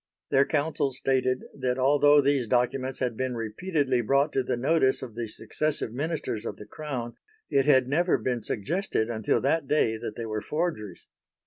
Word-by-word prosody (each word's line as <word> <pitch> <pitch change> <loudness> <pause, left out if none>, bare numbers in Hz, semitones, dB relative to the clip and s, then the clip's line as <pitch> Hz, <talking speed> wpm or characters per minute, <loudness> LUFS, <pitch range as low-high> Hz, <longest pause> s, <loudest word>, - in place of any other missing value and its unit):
Their 135 +1 +4
counsel 145 -2 0
stated 130 0 0 0.2
that 125 -1 0
although 145 +2 +5
these 140 -3 +1
documents 130 +2 0
had 125 -3 -2
been 130 +1 -2
repeatedly 130 - -1
brought 140 +6 +2
to 135 - +2
the 125 - -2
notice 130 0 +2
of 120 -4 -7
the 115 0 -4
successive 150 +1 -2
Ministers 145 -6 -3
of - - -5
the 105 - -10
Crown, 125 -1 -6 0.3
it 135 -1 +3
had 130 -3 +4
never 170 +6 +2
been 125 -2 -2
suggested 120 - -1
until 110 -2 +1
that 145 +2 +1
day 130 -6 +2
that 115 - -6
they 115 - -5
were 110 -1 -3
forgeries. 150 - -3
130 Hz, 175 wpm, -27 LUFS, 120-145 Hz, 0.3 s, although